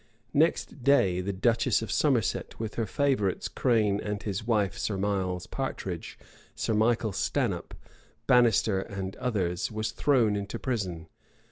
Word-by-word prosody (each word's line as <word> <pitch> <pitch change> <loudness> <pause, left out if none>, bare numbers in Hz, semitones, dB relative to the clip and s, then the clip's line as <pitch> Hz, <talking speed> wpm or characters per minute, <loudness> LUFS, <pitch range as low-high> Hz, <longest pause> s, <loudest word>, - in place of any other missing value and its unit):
Next 150 -2 +1
day, 100 -10 +4
the 100 +2 -2
duchess 115 +3 +2
of 110 - -5
Somerset, 130 -9 0
with 110 -2 -4
her 115 -2 -2
favorites 125 -6 0
Crane 110 -5 +1
and 105 0 -4
his 105 +1 -3
wife, 105 -4 +1
Sir 100 - -2
Miles 95 -2 -1
Partridge, 95 -10 -5 0.4
Sir 110 - -1
Michael 110 0 +2
Stanhope, 95 - -1 0.5
Bannister, 115 -5 +4
and 95 -1 -5
others, 95 -8 -1
was 110 0 -2
thrown 115 -4 +2
into 100 0 -4
prison. 95 -10 -3
105 Hz, 135 wpm, -28 LUFS, 95-120 Hz, 0.5 s, day